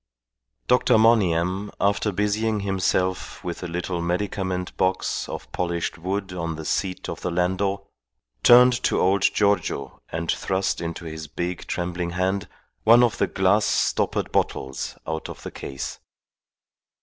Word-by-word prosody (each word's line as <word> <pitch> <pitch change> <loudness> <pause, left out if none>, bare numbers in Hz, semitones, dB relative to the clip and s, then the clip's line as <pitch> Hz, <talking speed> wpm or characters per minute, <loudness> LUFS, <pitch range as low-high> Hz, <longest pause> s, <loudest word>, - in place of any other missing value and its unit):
Dr. - - +4
Monygham, 100 -3 +3
after 100 +1 +1
busying 105 +2 0
himself 95 -1 -1
with 85 -1 -5
a 90 - -4
little 85 +1 -3
medicament 90 +1 -2
box 95 0 0
of - - -7
polished 85 -1 -2
wood 95 +2 -3
on 85 -2 -3
the 80 0 -7
seat 95 +2 -2
of - - -6
the - - -2
landau, 95 +3 0 0.6
turned 125 - +8
to - - +1
old 95 +1 +3
Giorgio 100 +1 +1
and 85 +1 -1
thrust 95 0 -1
into 85 +1 -5
his 80 -1 -6
big, 85 +3 -4
trembling 90 0 -2
hand 95 +2 0 0.4
one 115 +2 +7
of 115 -1 +1
the - - +3
glass 100 +3 +2
stoppered - - 0
bottles 65 -1 -2
out 80 0 -4
of - - -9
the - - -6
case. 65 -1 -6
95 Hz, 140 wpm, -24 LUFS, 85-100 Hz, 0.6 s, turned